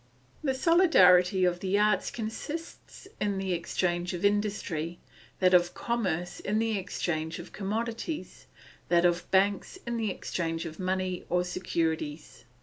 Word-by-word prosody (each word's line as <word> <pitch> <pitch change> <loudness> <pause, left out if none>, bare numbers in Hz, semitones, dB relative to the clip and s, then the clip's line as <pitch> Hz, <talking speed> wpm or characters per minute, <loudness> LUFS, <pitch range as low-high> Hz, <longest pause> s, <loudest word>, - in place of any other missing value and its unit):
The 265 -3 +1
solidarity 190 - +5
of 175 0 +1
the 190 +2 0
arts 210 -2 +2
consists 295 - -7
in 205 -2 0
the 190 -1 -1
exchange 175 +1 -1
of 175 - -2
industry, 200 -5 0 0.4
that 185 -1 +4
of 175 0 +4
commerce 185 -7 -2
in 210 +2 -1
the 225 0 +1
exchange 165 -4 -2
of 175 - -9
commodities, 230 - -4 0.4
that 175 0 +4
of 175 0 +1
banks 195 - +2
in 235 0 -2
the 220 -2 0
exchange 165 -3 -3
of 160 -1 -8
money 185 -1 -1
or 180 0 +2
securities. 160 -7 -3
185 Hz, 140 wpm, -29 LUFS, 175-210 Hz, 0.4 s, solidarity